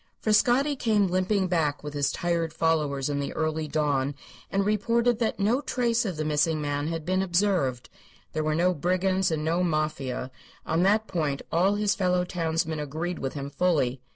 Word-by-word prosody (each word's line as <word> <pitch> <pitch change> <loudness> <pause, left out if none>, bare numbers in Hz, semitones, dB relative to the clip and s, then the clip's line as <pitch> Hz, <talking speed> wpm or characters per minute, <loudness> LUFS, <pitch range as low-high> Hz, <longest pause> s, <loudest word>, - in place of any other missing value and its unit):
Frascatti 245 +6 +3
came 220 -5 +2
limping 185 +1 +1
back 155 -5 0
with 150 -1 -6
his 140 -1 0
tired 170 -2 -1
followers 150 -4 0
in 145 -1 -1
the 140 - -3
early 155 0 -1
dawn, 145 -2 0 0.3
and 195 0 0
reported 230 +3 +1
that 225 -3 -1
no 225 +7 +2
trace 235 -4 0
of 185 -6 -3
the 155 - -2
missing 155 +1 +1
man 145 0 -2
had 165 -1 -4
been 185 +2 +1
observed. 175 -9 0 0.5
There 155 - -1
were 155 0 0
no 180 +3 +3
brigands 185 +3 +1
and 155 -2 -2
no 170 +3 +1
Mafia; 155 -6 -2 0.3
on 160 +2 +1
that 210 +4 +3
point 150 -8 -2
all 185 +5 +3
his 205 -1 +1
fellow 180 -2 +1
townsmen 165 -2 -1
agreed 160 +5 -4
with 135 - -3
him 140 0 -5
fully. 140 -6 +1
165 Hz, 180 wpm, -26 LUFS, 150-195 Hz, 0.5 s, Frascatti